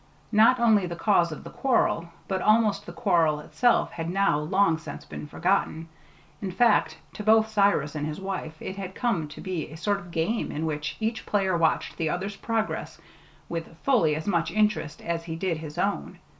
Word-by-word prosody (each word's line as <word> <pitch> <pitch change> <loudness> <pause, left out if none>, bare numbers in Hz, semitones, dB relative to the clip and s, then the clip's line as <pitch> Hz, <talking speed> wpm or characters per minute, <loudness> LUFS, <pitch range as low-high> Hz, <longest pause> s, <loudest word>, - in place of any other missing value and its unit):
Not 225 +3 +5
only 215 -5 +4
the 170 - -5
cause 170 -2 +2
of 155 - -7
the - - -9
quarrel, 235 -9 +1 0.2
but 190 -1 -1
almost 215 -1 +3
the - - -6
quarrel 170 -10 +2
itself, 240 +10 +2
had 165 0 -4
now 195 -4 +2
long 165 +1 +2
since 165 - -8
been - - -8
forgotten; 165 -1 0 0.5
in 195 - -3
fact, 230 +4 +3 0.2
to 210 - -6
both 220 +1 +4
Cyrus 200 -8 +2
and 150 -1 -3
his 155 0 -5
wife 185 -5 -5
it 190 - -6
had 190 -1 -6
come 195 -11 0
to 150 - -11
be 185 -5 -4
a 155 - -10
sort 200 +4 0
of 175 -3 -12
game 170 +8 -1
in 155 +2 -3
which 150 -1 -3
each 220 +1 -2
player 195 -3 +1
watched 165 -1 +1
the 160 -1 0
other's 195 +5 -3
progress 225 +1 -3 0.5
with 165 -1 -6
fully 215 - +3
as 155 - -5
much 170 -5 +1
interest 210 -7 0
as 165 0 -3
he 160 -1 -4
did 170 -1 -1
his 155 -1 -8
own. 200 +1 -1
185 Hz, 195 wpm, -26 LUFS, 160-210 Hz, 0.5 s, Not